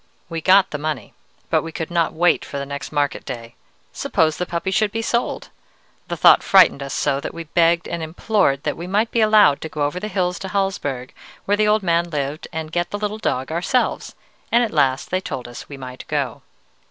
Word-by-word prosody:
"We 165 -1 -4
got 190 +3 +5
the 150 - -4
money, 155 +1 -4 0.4
but - - +3
we 165 - -7
could 160 0 -5
not 170 -1 +1
wait 175 +2 +2
for 140 - -6
the 140 - -3
next 140 0 -6
market 145 -2 -1
day. 115 -1 -7 0.4
Suppose 155 -1 +1
the 180 - -2
puppy 170 +3 -2
should 215 +1 +2
be 225 +1 -3
sold! 235 +1 -1 0.6
The - - -4
thought - - +7
frightened 190 -7 +5
us 140 -1 -4
so 135 - +1
that 140 - -6
we 170 - -5
begged 170 +1 +2
and 170 - -4
implored 160 -3 0
that 150 - -1
we 170 - -7
might 210 +4 +1
be 230 - +2
allowed 215 -10 +5
to 160 - -5
go 150 -2 -2
over 145 +5 -1
the 210 - -4
hills 180 -4 -1
to 195 - -5
Hallsberg 185 -10 -2 0.3
where 205 - +2
the 215 0 +3
old 210 0 +3
man 170 -1 +1
lived, 145 -1 -3
and 160 -1 -5
get 175 +1 -1
the 205 - -3
little 210 +1 -3
dog 130 -8 -2
ourselves, 180 +10 -1 0.4
and 235 +1 +4
at 225 - -2
last 135 -3 +1
they 185 +1 0
told 125 -9 -5
us 120 - -10
we 140 - -8
might 130 -1 -9
go. - - -2
170 Hz, 220 wpm, -21 LUFS, 145-195 Hz, 0.6 s, thought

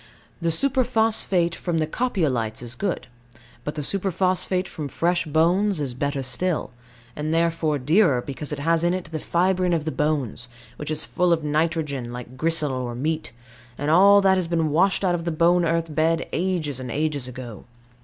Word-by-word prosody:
The 170 - +1
superphosphate 225 - +2
from 170 -1 -2
the 155 - +1
Copiolites 145 - -1
is 120 0 -7
good; 190 +7 -3 0.6
but 150 - -4
the 150 - -3
superphosphate 185 +1 0
from 150 -4 -6
fresh 170 +3 0
bones 175 +5 +2
is 135 -4 -3
better 140 +2 -2
still, 170 +6 -1 0.4
and 150 +1 -3
therefore 165 -2 +1
dearer, 150 - +3
because 140 +4 -6
it 150 - -3
has 165 +3 +1
in 175 +1 +2
it 175 -4 -6
the 160 - -3
fibrine 180 +2 +1
of 155 -2 -2
the 155 - -1
bones, 140 -6 -2 0.3
which 150 - -5
is 155 0 +1
full 180 -1 0
of 165 -2 +2
nitrogen, 150 -4 -1
like 125 +1 -8
gristle 155 0 +1
or 125 -2 -3
meat; 155 +5 -2 0.5
and 145 +2 -1
all 200 +4 +7
that 190 -1 +4
has 180 -2 -1
been 165 -2 0
washed 190 +5 +2
out 180 - +2
of 170 -1 -2
the 170 - -2
bone 170 +2 +3
earth 165 -1 -1
bed 160 +2 +1
ages 165 -7 -1
and 130 -1 -6
ages 145 -2 -1
ago. 125 -4 -9
160 Hz, 180 wpm, -23 LUFS, 145-180 Hz, 0.6 s, all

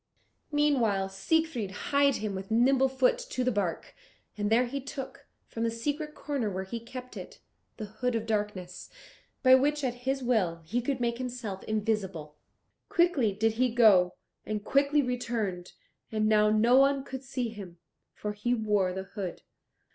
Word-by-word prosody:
Meanwhile 245 -10 +2
Siegfried 245 +2 0
hied 280 +7 +1
him 210 -2 -3
with 190 0 -6
nimble 260 +4 +4
foot 485 - +2
to - - -3
the 255 - +2
bark, 200 -6 -2 0.4
and 205 -1 -1
there 235 +3 +4
he 275 +3 -4
took, 270 0 -8 0.2
from 225 - -7
the 230 - +2
secret 295 +7 -3
corner 280 -7 -2
where 190 -1 -3
he 230 +5 -5
kept 250 +2 -9
it, - - -9 0.4
the 215 - -5
Hood 230 +4 -2
of 225 -1 -1
Darkness, 205 -5 -3 0.5
by 255 -1 +7
which, 290 +3 +3
at 250 -2 0
his 265 +2 -3
will, 185 -9 0
he 235 +9 -1
could 255 +1 -2
make 235 0 -1
himself 240 -6 -5
invisible. 200 -8 -2 0.5
Quickly 340 -11 +3
did 220 +3 +1
he 255 - +4
go, 200 -7 +5 0.3
and 210 -1 -4
quickly 280 +1 +3
returned, 230 -8 -3 0.4
and 215 -1 +1
now 210 -1 +4
no 225 +4 +4
one 275 0 +4
could 265 -1 -7
see 255 -2 -3
him, 195 -6 -10 0.3
for 210 0 -5
he 240 +4 0
wore 210 -5 +1
the 190 +1 -4
hood. 190 -2 -6
230 Hz, 165 wpm, -29 LUFS, 205-265 Hz, 0.5 s, by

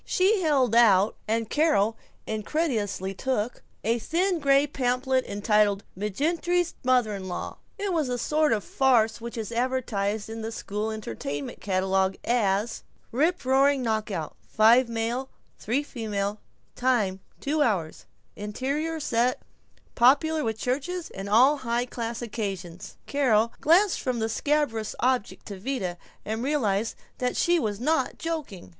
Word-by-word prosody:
She 385 +2 +2
held 275 - +2
out, 210 -3 +5
and 225 +1 0
Carol 225 -7 +2 0.3
incredulously 215 - -2
took, 245 +1 -2 0.2
a 230 +3 +1
thin 350 - 0
gray 275 -1 +4
pamphlet 260 -1 0
entitled 205 0 +2
"McGinerty's 330 - 0
Mother 250 -4 +3
in 190 -2 -6
law." 180 - -5 0.2
It 400 -2 -2
was 315 -5 +1
the 250 0 -1
sort 305 +4 +1
of 210 -3 +1
farce 230 -5 +2
which 235 +1 -6
is 220 0 -4
advertised 230 -4 -1
in 225 0 -5
"school 210 -1 -3
entertainment" 145 - -5
catalogues 190 0 +1
as: 220 -2 +1 0.3
Riproaring 280 -2 +3
knock 220 -3 -1
out, 165 -7 -4
5 230 +3 +5
m. 230 +3 -2 0.3
3 270 +7 -1
f., 205 -3 -2 0.4
time 225 -7 +1 0.2
2 300 +3 -1
hrs., 195 - 0 0.3
interior 275 +10 -3
set, 245 -3 0 0.5
popular 295 +6 +4
with 220 -3 -2
churches 290 +9 -3
and 195 +1 -6
all 255 +8 +5
high 240 -2 -1
class 235 -1 -5
occasions. 195 -6 -5
Carol 230 -5 +2
glanced 355 +5 +4
from 255 -2 -1
the 220 0 -1
scabrous 245 -4 0
object 255 -4 0
to 200 -2 -7
Vida, 190 -7 -3 0.3
and 220 +2 -3
realized 230 -6 0 0.2
that 250 0 -1
she 345 0 +3
was 210 -7 -2
not 315 +6 0
joking. 305 - -5
235 Hz, 135 wpm, -26 LUFS, 210-280 Hz, 0.5 s, out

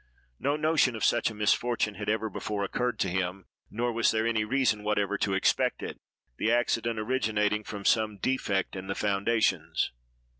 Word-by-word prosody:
No 140 +1 +1
notion 155 -5 +2
of 110 - -1
such 120 - +3
a 110 - -9
misfortune 105 +1 +1
had 105 0 -5
ever 110 +1 0
before 105 -1 -3
occurred 120 +3 -1
to - - +2
him, 95 +1 -2 0.2
nor 120 +2 -1
was 115 0 +3
there 110 0 +1
any 115 -2 +1
reason 115 -2 +1
whatever 105 -1 0
to 100 -2 +1
expect 95 - +1
it; - - -6 0.4
the 110 - +1
accident 115 -1 +1
originating 110 -2 0
from 100 -1 -7
some 110 -2 +2
defect 100 -5 -1
in 95 0 -6
the 95 - -2
foundations. 105 +2 +1
110 Hz, 175 wpm, -28 LUFS, 100-120 Hz, 0.4 s, such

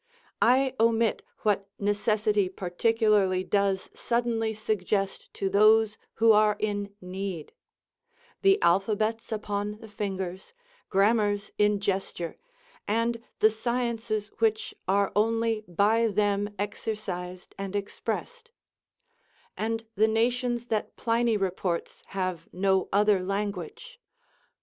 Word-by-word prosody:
I 260 +2 +4
omit 225 -1 +3 0.2
what 200 -2 +1
necessity 205 -1 +1
particularly 195 0 +1
does 195 -1 +1
suddenly 235 -2 0
suggest 210 -2 -2
to 195 - -1
those 215 +2 +5 0.2
who 225 0 +5
are 210 -1 +5
in 205 -1 -2
need; 185 -3 -5 0.9
the 390 +1 +5
alphabets 215 +5 +1
upon 210 -1 -3
the 225 - -11
fingers, 190 - -5 0.3
grammars 205 0 +2
in 210 0 +3
gesture, 190 -3 -3 0.5
and 230 +2 0 0.2
the 215 - +6
sciences 230 -2 -2
which 220 -1 +1
are 200 +1 +2
only 225 +1 +1
by 210 +6 +3
them 205 -1 +1
exercised 190 -3 -5
and 195 0 -4
expressed; 465 - -4 1.1
and 225 +1 -2
the 215 +1 +3
nations 240 +2 0
that 215 - -2
Pliny 230 -1 +1
reports 185 -3 -2
have 185 -4 -3
no 190 +1 +1
other 205 -1 +4
language. 210 - -4
210 Hz, 105 wpm, -27 LUFS, 195-225 Hz, 1.1 s, the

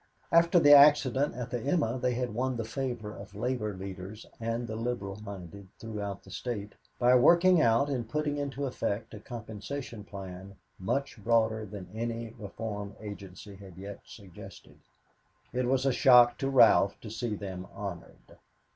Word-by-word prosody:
After 170 +1 +5
the 145 -2 +7
accident 145 -2 +6
at 125 -1 -5
the 120 - -1
"Emma" 135 -3 0
they 125 -1 0
had 125 -2 -2
won 130 +2 -1
the 115 - -2
favor 120 -3 -4
of - - -11
labor 110 -2 -2
leaders 95 +2 -8
and 115 +1 -2
the 110 - -5
liberal 110 -4 -4
minded 100 -1 -9
throughout 105 -3 -6
the 95 - -14
State 105 -2 -5 0.2
by 125 0 +4
working 170 +7 +6
out 115 +2 +3
and 125 -6 -3
putting 150 +1 -1
into 140 -1 -3
effect 115 -4 -3
a 105 - -8
compensation 115 +1 -7
plan 95 -1 -9 0.2
much 110 +3 -2
broader 110 -1 +2
than 95 -2 -8
any 115 0 -4
reform 105 -1 -6
agency 100 -1 -9
had 95 -3 -13
yet 100 +1 -8
suggested. 95 -6 -13 0.7
It 125 0 0
was 130 +1 +1
a 135 - +3
shock 120 -2 +6
to 135 - -1
Ralph 115 -6 +5
to 110 - -8
see 115 -1 -3
them 95 -2 -7
honored. 100 -4 -9
115 Hz, 160 wpm, -29 LUFS, 100-125 Hz, 0.7 s, the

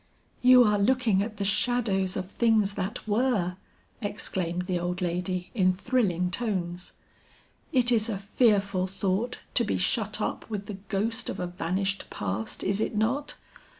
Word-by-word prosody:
"You 250 0 +8
are 210 -2 +3
looking 225 -2 +3
at 215 +1 -4
the 200 - -2
shadows 195 -3 +1
of 185 0 -5
things 220 -4 +2
that 195 +2 -4
were," 210 -5 +1 0.4
exclaimed 180 -4 -2
the 180 -1 -1
old 175 +1 -2
lady 180 +1 -2
in 185 -5 +3
thrilling 185 -5 0
tones. 180 -4 -3 0.8
"It 250 -1 +3
is 225 -1 +2
a 205 - -1
fearful 200 -2 +2
thought 195 +5 -1 0.2
to 240 - +3
be 215 - 0
shut 210 +3 +1
up 215 - -3
with 205 -2 -4
the 200 -1 -7
ghost 225 +4 -1
of - - -4
a 180 - -1
vanished 185 +3 -2
past, 105 +2 -3
is 195 +2 0
it 220 - -1
not? 240 +7 0
200 Hz, 155 wpm, -27 LUFS, 185-225 Hz, 0.8 s, You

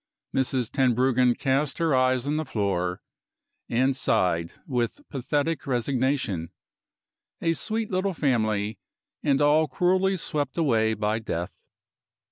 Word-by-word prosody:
Mrs. 130 -3 0
Tenbruggen 125 -1 +3
cast 135 +1 0
her 165 -3 +1
eyes 130 -1 +2
on 150 +2 0
the 155 - 0
floor, 95 - -2 0.7
and 130 +3 +2
sighed 90 -9 +1
with 125 - -2
pathetic 145 +3 -1
resignation. 125 - 0 0.9
A 165 - +1
sweet 220 +5 -3
little 185 0 0
family, 110 -7 0 0.4
and 140 -2 +2
all 155 +2 +4
cruelly 185 +6 +2
swept 145 -5 -3
away 110 -8 +2
by 105 +1 0
death. 85 -5 -4
130 Hz, 115 wpm, -26 LUFS, 110-150 Hz, 0.9 s, all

